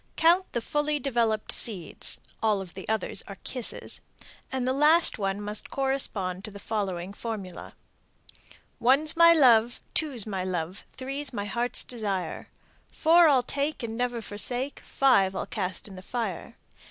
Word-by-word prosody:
Count 345 +4 +4
the 235 - -1
fully 295 +4 0
developed 235 -6 0
seeds 190 - -1 0.2
(all 215 -2 +2
of 185 -3 -8
the 190 +2 -9
others 220 -1 -1
are 200 - -8
kisses), 250 -3 -3 0.5
and 260 -1 -1
the 260 - +2
last 300 0 +4
one 195 0 -1
must 210 0 -3
correspond 215 -9 0
to 215 - -5
the 200 - -10
following 195 -3 -3
formula: 205 -5 -6 1.0
One's 270 +6 +5
my 335 0 +8
love, 240 -7 +5
Two's 275 -9 0
my 195 -4 -3
love, 180 0 -4
Three's 275 +2 -3
my 205 -2 -3
heart's 240 +4 -1
desire. 200 -8 -4 0.4
Four 335 +1 +5
I'll 260 -4 +4
take 285 +1 -2
and 225 -1 -4
never 245 -1 -2
forsake, 245 +7 -2
Five 200 -8 +3
I'll - - -2
cast 190 -3 -4
in 200 - -11
the 185 - -9
fire. 215 -3 -4
230 Hz, 155 wpm, -27 LUFS, 195-270 Hz, 1.0 s, my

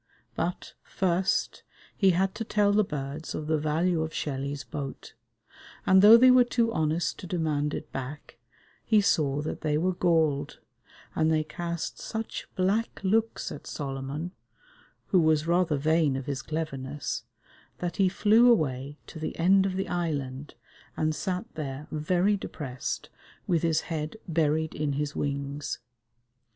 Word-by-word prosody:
But, 175 +2 -3
first, 185 0 0 0.3
he 195 - +4
had 190 +2 +2
to 225 - -4
tell 210 -2 +2
the 210 +1 +4
birds 145 -2 -5
of 155 - -4
the 155 0 +1
value 160 +3 +1
of 160 0 -4
Shelley's 140 0 -3
boat; 135 +2 -7 0.7
and 190 0 +6
though 215 +3 +10
they 255 +2 +7
were 255 0 +7
too 235 -1 0
honest 160 +2 0
to 180 - -7
demand 155 -4 -1
it 150 - -7
back, 135 -1 -7 0.4
he 215 -2 +4
saw 150 -7 +2
that 155 - -4
they 150 -1 +1
were 185 +4 +1
galled, 160 -5 +1 0.6
and 160 0 +2
they 155 -1 +2
cast 170 +1 -4
such 220 -1 -5
black 200 +5 0
looks 225 +4 +1
at 145 - -9
Solomon, 140 +4 -4 0.8
who 185 - +5
was 155 -2 +3
rather 170 -3 +2
vain 155 -1 +2
of 135 -1 -4
his 140 -1 -3
cleverness, 145 -3 -4 0.5
that 175 -1 -4
he 195 -2 +4
flew 220 +5 +5
away 140 - 0
to 160 - -10
the 155 - -4
end 190 +3 +4
of 185 - -3
the 190 0 -2
island, 145 -6 -3 0.4
and 155 0 +1
sat 185 +4 -2
there 145 -1 -5
very 175 +6 +2
depressed 135 - -5 0.4
with 170 -3 +1
his 160 -2 +2
head 155 +3 -4
buried 160 -1 +1
in 150 -1 -1
his 145 +1 -2
wings. 140 -3 -3
160 Hz, 150 wpm, -28 LUFS, 145-185 Hz, 0.8 s, though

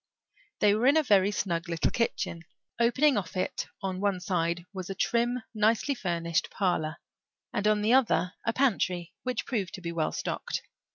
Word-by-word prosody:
They 205 -1 +6
were 225 +4 +2
in 285 +3 +6
a 315 - +4
very 200 -6 +4
snug 175 -4 -2
little 170 -1 0
kitchen. 230 -7 -1 0.4
Opening 260 +4 +4
off 185 -2 -3
it 185 - -2 0.2
on 190 -1 -2
one 200 -2 +1
side 170 -1 -1
was 185 -2 -6
a 195 - -3
trim, 240 +2 +1
nicely 220 +6 +2
furnished 170 -7 -1
parlour, 170 -5 -1 0.6
and 205 0 0
on 210 -1 +3
the 220 +3 +3
other 230 -8 +3
a 230 - +1
pantry, 185 -9 0
which 255 -2 -2
proved 210 -7 -2
to 190 - -10
be 170 -1 -4
well 165 -2 0
stocked. - - -3
200 Hz, 175 wpm, -29 LUFS, 175-235 Hz, 0.6 s, They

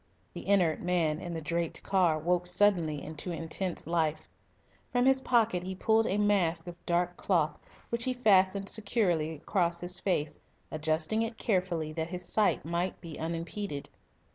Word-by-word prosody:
The - - -8
inert 180 -6 +3
man 170 -4 +1
in 175 - -6
the 165 -1 -4
draped 170 +2 -2
car 180 -5 +2
woke 175 +3 0
suddenly 175 -5 +2
into 155 +3 -6
intense 165 +2 -4
life. 160 -2 0 0.6
From 245 0 +2
his 265 0 +4
pocket 225 -8 +2
he 185 +1 -5
pulled 220 +4 +2
a 195 - 0
mask 185 -6 +2
of 175 -1 -10
dark 175 0 +1
cloth, 155 -6 +1 0.3
which 235 0 -1
he 255 - +1
fastened 195 -4 +3
securely 185 -8 +1
across 170 +2 0
his 175 +1 -1
face, 150 -6 -1 0.3
adjusting 155 +7 0
it 225 0 -3
carefully 180 -6 -1
that 160 +1 -3
his 180 0 -4
sight 215 -4 +1
might 170 +3 -2
be 165 -3 -9
unimpeded. 165 0 -4
175 Hz, 160 wpm, -30 LUFS, 160-200 Hz, 0.6 s, his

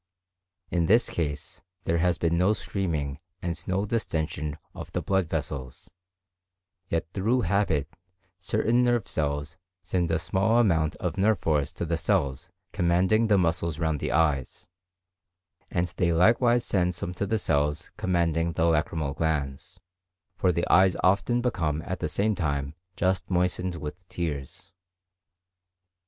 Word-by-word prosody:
In 85 -2 +1
this 115 +5 +4
case 75 -3 -4 0.2
there 85 -1 +1
has 85 0 +2
been 85 0 +1
no 90 +5 +3
screaming 80 -10 -2 0.2
and 85 -2 -3
no 95 +2 0
distension 80 -8 -2 0.2
of - - -8
the - - -1
blood 95 -4 +1
vessels, 70 -5 -4 1.0
yet 85 0 0
through 115 +6 +1
habit 90 - +1 0.5
certain 115 +5 +1
nerve 120 -3 +2
cells 75 +2 -2 0.3
send 90 -1 0
a 80 - +2
small 95 +6 +1
amount 80 -9 +2
of - - -3
nerve 105 +2 +3
force 75 -3 0
to - - -4
the 85 0 -1
cells 75 -10 0 0.2
commanding 90 +6 +3
the 105 -2 +4
muscles 85 -3 0
round 80 -3 0
the - - -2
eyes; 75 -5 0 1.0
and 85 0 0
they 85 -1 +2
likewise 120 +7 +4
send 90 -2 +1
some 90 +1 -4
to 100 +2 -3
the 110 - +1
cells 75 -3 0
commanding 85 -2 +1
the 80 - 0
lacrymal 80 -3 0
glands, 80 +4 -2 0.6
for 95 - +2
the 85 0 -1
eyes 95 -1 +5
often 100 +6 +2
become 80 -10 -1
at - - -4
the - - -2
same 105 +2 +1
time 70 -6 -2 0.2
just 90 -1 0
moistened 90 0 0
with 85 +3 -7
tears. 75 -5 -5
85 Hz, 145 wpm, -27 LUFS, 80-95 Hz, 1.0 s, eyes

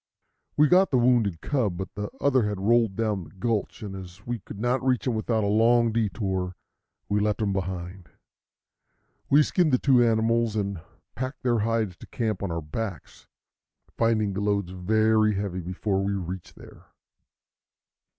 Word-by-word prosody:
We 150 +1 +6
got 185 +4 +5
the 130 - +2
wounded 120 -8 +2
cub, 115 -11 -1
but 95 +1 -6
the 105 0 -4
other 130 -6 +2
had 105 -2 -4
rolled 115 0 +2
down 105 -4 -1
the - - -13
gulch; 105 +2 -3
and 100 -2 -6
as 95 +1 -10
we 120 -1 -3
could 100 - -10
not 120 +3 0
reach 130 -2 +1
him 125 - +1
without 110 0 0
a - - +1
long 115 +2 +4
detour, 95 -5 -1 0.5
we 105 0 +1
left 105 0 0
him 105 -3 0
behind. 90 -1 -5 1.2
We 145 +2 +6
skinned 170 0 +1
the 125 - +4
two 125 -2 +4
animals 115 0 +2
and 100 -4 -2 0.3
packed 130 +2 -5
their 120 -2 +2
hides 110 -4 -1
to - - -13
camp 110 -3 -2
on 100 -3 -2
our 85 -1 -3
backs, 95 +4 -6 0.7
finding 110 -3 +1
the 95 - -3
loads 100 -3 0
very 110 +3 +2
heavy 95 -2 -3
before 95 +3 -2
we 100 +1 -1
reached 95 -1 -6
there. - - -15
105 Hz, 170 wpm, -26 LUFS, 95-115 Hz, 1.2 s, We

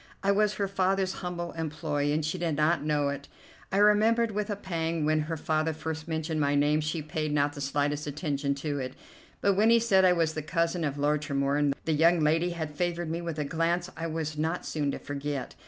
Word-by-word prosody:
I 200 - +3
was 210 0 +2
her 200 0 -1
father's 190 0 +1
humble 175 -1 -4
employee, 150 -2 -2
and 155 0 0
she 165 +4 -2
did 165 -3 0
not 155 +2 +2
know 150 -2 +1
it. 140 0 -5 0.4
I 190 - +1
remembered 215 +3 +4
with 210 0 -2
a 205 - -1
pang 165 -5 -2
when 155 0 +2
her 155 +2 -2
father 155 +1 0
first 160 0 -5
mentioned 160 -1 -2
my 145 0 +2
name 145 +2 +3
she 155 +1 -2
paid 155 0 -3
not 145 0 +1
the 145 - -7
slightest 145 +1 -1
attention 140 -2 -1
to 145 0 -3
it; 130 -1 -5 0.5
but 200 - +3
when 210 +4 +4
he 235 - +7
said 205 -5 +4
I 185 -1 +6
was 165 -2 +1
the 155 - -3
cousin 165 +2 0
of 145 -2 -2
Lord 145 +1 +1
Tremorne 140 0 +1
the 160 - +1
young 165 +3 +4
lady 160 +3 +2
had 160 -3 -4
favored 175 0 -1
me 170 +1 -2
with 170 -2 -4
a 150 - -1
glance 170 +4 0
I 165 +1 -3
was 155 -1 -3
not 160 +3 -1
soon 150 -2 -1
to - - -2
forget. 145 -1 -4
160 Hz, 220 wpm, -28 LUFS, 150-175 Hz, 0.5 s, he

